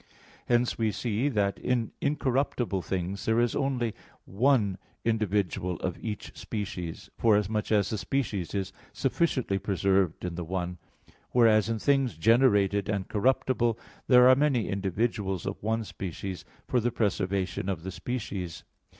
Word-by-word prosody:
Hence 120 0 +2
we 110 -1 +2
see 120 +5 -1
that 100 -6 0
in 120 -3 0
incorruptible 130 -7 0
things 95 +2 -3
there 110 +1 +3
is 120 -1 +1
only 125 -5 0 0.3
one 105 -3 +2 0.3
individual 100 -5 0
of 90 -1 -4
each 110 -3 -5
species, 95 -6 -5
forasmuch 105 -1 +2
as 105 -2 +3
the 110 - -2
species 105 -10 -2
is 95 -1 -2 0.2
sufficiently 130 - 0
preserved 95 -3 +1
in 90 - -3
the 85 +1 -4
one; 90 0 -3 0.5
whereas 115 -3 +5
in 115 - 0
things 135 - +1
generated 100 -2 +3
and 100 -3 -2
corruptible 120 0 +1 0.3
there 125 -1 +7
are 130 - +9
many 135 -4 +2
individuals 100 -1 -1
of 100 - -4
one 110 +2 0
species 95 -2 -6 0.2
for 125 - +2
the 120 +1 +1
preservation 100 -4 -1
of 85 -4 -3
the 95 - -4
species. 100 -7 -5
105 Hz, 140 wpm, -28 LUFS, 95-120 Hz, 0.5 s, are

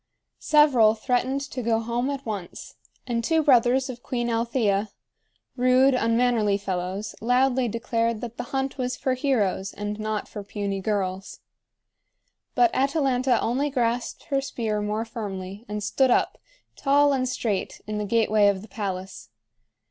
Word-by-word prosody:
Several 265 -8 +5
threatened 255 +4 0
to 270 -2 -5
go 225 -1 +1
home 235 +3 -2
at 275 -1 -4
once; 205 -6 -6 0.3
and 235 -2 -1
two 320 +5 +2
brothers 260 -1 +4
of 245 -2 -7
Queen 240 -1 -2
Althea, 225 -3 0 0.7
rude, 255 +2 +4
unmannerly 230 -3 +2
fellows, 190 +1 -4
loudly 250 +2 +2
declared 230 0 -1
that 235 -1 -6
the 245 - -4
hunt 270 0 -2
was 250 0 -2
for 260 - 0
heroes 220 -8 0
and 205 +1 -5
not 215 -1 -3
for 205 - -7
puny 200 -1 -3
girls. 190 -2 -3 1.1
But 360 0 +4
Atalanta 265 -3 +1
only 265 +6 0
grasped 245 -3 -1
her 275 0 +2
spear 225 -5 -2
more 210 +2 -2
firmly 200 -2 -6
and 210 0 -4
stood 260 +6 +2
up, - - +1 0.4
tall 285 +1 +3
and 255 -2 0
straight, 215 -6 -2
in 215 0 -3
the 210 - -2
gateway 215 -1 +3
of 200 -1 +1
the - - -11
palace. 185 - -5
230 Hz, 150 wpm, -25 LUFS, 210-255 Hz, 1.1 s, Several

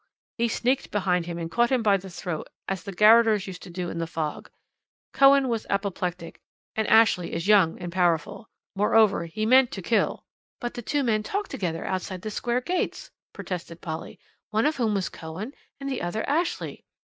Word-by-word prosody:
He 235 - +3
sneaked 250 +3 0
behind 180 -4 0
him 170 -1 -4
and 165 -1 -5
caught 240 +3 +3
him 255 -3 +2
by 205 -2 +5
the 195 0 -5
throat, 175 -2 -5 0.2
as 190 -2 -2
the 200 - -7
garroters 215 +1 +5
used 185 -2 -8
to 185 - -10
do 175 0 -4
in 170 - -5
the 165 - -2
fog. 155 -2 -4 0.6
Cohen 275 0 +6
was 230 -3 -2
apoplectic, 180 -4 -3 0.3
and 220 -1 0
Ashley 220 -6 +4
is 170 +3 -3
young 200 -6 +5
and 175 -1 -5
powerful. 175 +4 0 0.3
Moreover, 210 -2 +3
he 190 +6 -3
meant 255 +2 +6
to 195 - -5
kill 210 +5 0 0.2
" - - -81
"But 240 - -4
the 240 - -6
two 285 +5 -1
men 220 -4 +1
talked 405 - -3
together 165 -4 -3
outside 185 -1 -4
the 215 - -4
Square 240 +3 -1
gates," 360 +7 -2 0.2
protested 170 -2 -6
Polly, 160 -1 -6 0.3
"one 220 +1 +1
of 305 +1 +1
whom 225 -4 +1
was 190 -1 0
Cohen, 185 - -7 0.3
and 275 - -5
the 265 -2 -2
other 175 +5 -3
Ashley." 330 +5 -1
205 Hz, 190 wpm, -26 LUFS, 175-235 Hz, 0.6 s, Cohen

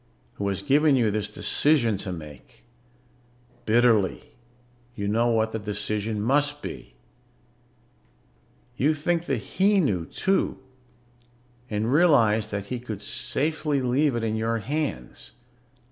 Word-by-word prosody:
who 100 - -2
has 100 0 -2
given 145 +3 +4
you 115 -5 +2
this 105 0 -2
decision 120 +1 +2
to 95 0 -5
make. 75 -5 -11 1.0
Bitterly, 110 -3 +2 0.6
you 100 -1 -3
know 115 +3 +2
what 110 -1 +1
the 110 - -3
decision 105 +1 -3
must 145 +6 0
be. - - -8 1.8
You 150 +4 +2
think 170 +3 -1
that 135 - 0 0.2
he 200 +1 +5
knew, 95 - 0
too, 195 0 0 1.1
and 110 +4 -1
realize 115 -10 +4
that 100 -1 -4
he 125 +4 -4
could 110 -4 -7
safely 150 +5 -1
leave 130 +2 +1
it 115 - -2
in 110 -1 -1
your 115 +1 0
hands. 130 - -4
115 Hz, 125 wpm, -25 LUFS, 105-145 Hz, 1.8 s, he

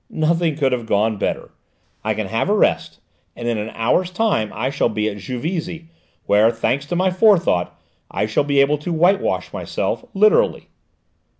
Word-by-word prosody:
"Nothing 160 0 0
could 140 -3 +1
have 120 -3 -2
gone 110 +1 +1
better: - - -3 0.5
I - - -1
can - - -3
have - - -1
a - - +3
rest, - - +1 0.4
and 120 - -6
in 115 -2 0
an 105 +1 -4
hour's 145 +11 +1
time 185 - 0
I 130 +3 -2
shall 140 - +1
be 105 -1 -1
at 105 -1 -4
Juvisy, 160 - -5 0.4
where, 105 +2 +4
thanks 125 +5 -1
to 175 - -2
my 185 +1 +2
forethought, 180 - +2 0.3
I - - -1
shall 110 +6 0
be 140 -1 +2
able 145 +1 +2
to 160 +4 -5
whitewash 180 +5 +1
myself - - -3
literally." 215 - +3
145 Hz, 175 wpm, -20 LUFS, 115-175 Hz, 0.5 s, where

